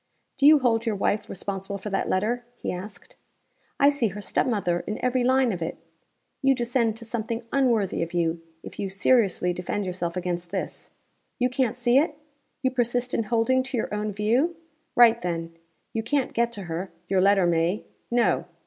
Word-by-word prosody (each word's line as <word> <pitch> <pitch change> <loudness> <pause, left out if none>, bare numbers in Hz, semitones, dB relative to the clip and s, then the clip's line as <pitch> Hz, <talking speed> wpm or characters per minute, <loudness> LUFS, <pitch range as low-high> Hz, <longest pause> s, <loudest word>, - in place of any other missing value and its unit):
"Do 280 - +4
you 305 0 +9
hold 235 -4 +2
your 220 - +1
wife 200 +1 0
responsible 195 +1 -4
for 200 +1 -6
that 195 - -1
letter?" 230 +6 0
he - - -3
asked. 190 +3 -9 0.6
"I 280 +1 +6
see 280 -5 +1
her 200 +1 -6
step 205 - 0
mother 200 -7 0
in 210 - -2
every 250 0 +2
line 260 -1 +3
of 180 -4 -4
it. 165 - -3 0.6
You 270 0 +4
descend 235 -2 0
to 230 - -9
something 230 0 -3
unworthy 240 -8 +2
of 165 0 -2
you, 170 -1 0 0.2
if - - -10
you 195 - -2
seriously 195 -3 +2
defend 180 +3 -3
yourself 180 -1 -3
against 175 -1 -3
this! - - -5 0.5
You 250 -2 +1
can't 250 -2 0
see 245 +1 +4
it? 305 0 0 0.5
You 260 - +2
persist 245 0 0
in 230 - 0
holding 235 +4 +2
to 260 -1 -4
your 220 - -2
own 210 0 -1
view? 235 - +1 0.4
Write, 235 -1 +6
then. 165 -2 -3 0.4
You 225 - -1
can't 260 +3 -1
get 235 0 +1
to 205 -3 -6
her 175 +2 -4 0.2
your 190 -1 +2
letter 195 -1 +4
may. 170 +3 +1 0.2
No! 240 0 +2
220 Hz, 185 wpm, -25 LUFS, 185-245 Hz, 0.6 s, you